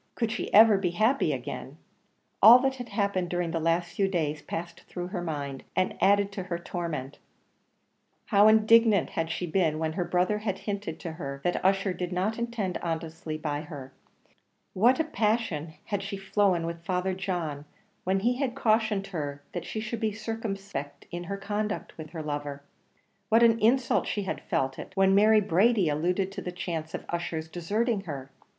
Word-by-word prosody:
Could 230 Hz, -2 st, -1 dB
she 225 Hz, -, -3 dB
ever 215 Hz, -1 st, +7 dB
be 185 Hz, -2 st, 0 dB
happy 245 Hz, +6 st, +3 dB
again? -, -, -5 dB, 0.6 s
All 235 Hz, +3 st, +11 dB
that 265 Hz, 0 st, 0 dB
had 245 Hz, -1 st, -7 dB
happened 200 Hz, -4 st, 0 dB
during 175 Hz, -1 st, -1 dB
the 165 Hz, -, -1 dB
last 165 Hz, +2 st, 0 dB
few 195 Hz, -, +1 dB
days 155 Hz, -5 st, -1 dB
passed 170 Hz, +3 st, -6 dB
through 180 Hz, 0 st, -5 dB
her 185 Hz, -2 st, -3 dB
mind, 145 Hz, -5 st, -4 dB
and 185 Hz, -, +1 dB
added 200 Hz, 0 st, +4 dB
to 195 Hz, -, -5 dB
her 175 Hz, -2 st, -3 dB
torment. 165 Hz, -6 st, -5 dB, 1.1 s
How 205 Hz, -1 st, +5 dB
indignant 220 Hz, -1 st, +5 dB
had 165 Hz, 0 st, -2 dB
she 180 Hz, -, -2 dB
been 160 Hz, -2 st, +1 dB
when 160 Hz, 0 st, -1 dB
her 180 Hz, +1 st, -1 dB
brother 180 Hz, +4 st, +1 dB
had 210 Hz, -3 st, -2 dB
hinted 200 Hz, -5 st, -4 dB
to 165 Hz, -, -4 dB
her 140 Hz, -4 st, -6 dB
that 175 Hz, -, 0 dB
Ussher 195 Hz, 0 st, +2 dB
did 180 Hz, 0 st, -4 dB
not 195 Hz, +6 st, -1 dB
intend 235 Hz, -6 st, -2 dB
honestly 160 Hz, -1 st, -4 dB
by 150 Hz, -2 st, -3 dB
her; 140 Hz, -4 st, -9 dB, 0.3 s
into -, -, -34 dB, 0.4 s
what 240 Hz, -, +4 dB
a -, -, +4 dB
passion 210 Hz, -, -1 dB
had 205 Hz, -2 st, -2 dB
she 200 Hz, 0 st, -5 dB
flown 195 Hz, -3 st, +1 dB
with 170 Hz, 0 st, -5 dB
Father 185 Hz, +1 st, -1 dB
John, 175 Hz, -6 st, -3 dB, 0.4 s
when 190 Hz, +1 st, +1 dB
he 245 Hz, +4 st, +1 dB
had 265 Hz, -3 st, -1 dB
cautioned 220 Hz, -5 st, +2 dB
her 145 Hz, -3 st, -4 dB
that 175 Hz, -1 st, -4 dB
she 220 Hz, -, -4 dB
should 220 Hz, +1 st, -4 dB
be 220 Hz, -1 st, 0 dB
circumspect 200 Hz, -8 st, -5 dB
in 175 Hz, 0 st, -5 dB
her 200 Hz, +3 st, -4 dB
conduct 210 Hz, +1 st, -3 dB
with 155 Hz, -1 st, -7 dB
her 160 Hz, -1 st, -6 dB
lover; 145 Hz, -1 st, -4 dB, 0.7 s
what 225 Hz, +2 st, +5 dB
an 230 Hz, -1 st, +5 dB
insult 240 Hz, +3 st, +3 dB
she 205 Hz, -, -1 dB
had 190 Hz, -, -4 dB
felt 135 Hz, -6 st, -1 dB
it -, -, -8 dB
when 195 Hz, 0 st, +4 dB
Mary 215 Hz, +2 st, +6 dB
Brady 200 Hz, 0 st, +3 dB
alluded 180 Hz, +6 st, 0 dB
to 195 Hz, 0 st, -6 dB
the 180 Hz, -, -4 dB
chance 165 Hz, -3 st, -4 dB
of -, -, -7 dB
Ussher's 170 Hz, -2 st, -3 dB
deserting 205 Hz, +7 st, -1 dB
her! 135 Hz, -4 st, -6 dB
185 Hz, 185 wpm, -28 LUFS, 165-210 Hz, 1.1 s, All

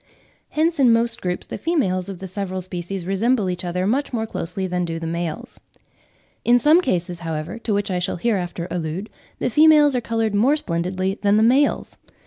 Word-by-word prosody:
Hence 320 Hz, +1 st, 0 dB
in 255 Hz, -3 st, +6 dB
most 230 Hz, 0 st, +1 dB
groups 180 Hz, -1 st, -3 dB
the -, -, -7 dB
females 200 Hz, -, 0 dB
of 195 Hz, -, -6 dB
the 190 Hz, -, -8 dB
several 185 Hz, 0 st, -4 dB
species 180 Hz, 0 st, -5 dB
resemble 200 Hz, +1 st, +1 dB
each 180 Hz, 0 st, -5 dB
other 180 Hz, +1 st, -2 dB
much 265 Hz, +8 st, 0 dB
more 225 Hz, -3 st, -1 dB
closely 190 Hz, -2 st, -4 dB
than 180 Hz, -1 st, -1 dB
do 165 Hz, -1 st, -3 dB
the 165 Hz, -, -5 dB
males. 170 Hz, +8 st, -4 dB, 0.8 s
In 240 Hz, +1 st, +5 dB
some 305 Hz, +8 st, +5 dB
cases, 180 Hz, -, -2 dB
however, 165 Hz, +4 st, -4 dB
to 230 Hz, -, -3 dB
which 205 Hz, -1 st, 0 dB
I 180 Hz, -, 0 dB
shall 180 Hz, +2 st, -2 dB
hereafter 180 Hz, -4 st, -2 dB
allude, 175 Hz, +4 st, -4 dB, 0.3 s
the -, -, -1 dB
females 300 Hz, 0 st, +6 dB
are 250 Hz, -, +1 dB
coloured 225 Hz, -2 st, -1 dB
more 240 Hz, +9 st, +3 dB
splendidly 185 Hz, -, -2 dB
than 205 Hz, 0 st, +3 dB
the 215 Hz, -, +4 dB
males. 265 Hz, +5 st, +2 dB
195 Hz, 190 wpm, -22 LUFS, 180-240 Hz, 0.8 s, in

